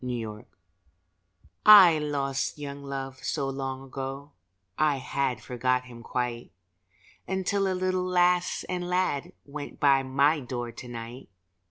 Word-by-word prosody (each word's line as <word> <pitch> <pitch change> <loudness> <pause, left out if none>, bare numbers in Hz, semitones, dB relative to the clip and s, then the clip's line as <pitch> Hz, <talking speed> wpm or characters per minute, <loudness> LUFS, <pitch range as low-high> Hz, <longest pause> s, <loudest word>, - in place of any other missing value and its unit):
THE 120 -2 -3
RETURN 105 -1 -9 1.2
I 190 -7 +9
lost 140 -2 -2
Young 140 -1 -7
Love 135 -1 -6
so 135 - -1
long 135 -1 -4
ago 135 +2 -6 0.4
I 155 -2 +2
had 130 -3 -2
forgot 125 +1 0
him 120 -2 -11
quite, 120 0 -3 0.8
Until 190 +1 0
a - - -1
little 185 0 0
lass 180 -1 +2
and 180 -1 -3
lad 180 -6 0
Went 145 0 -8
by 140 -2 +5
my 140 +4 +2
door 120 -2 -5
to 120 +2 -10
night. 120 +2 -8
135 Hz, 135 wpm, -27 LUFS, 125-160 Hz, 1.2 s, I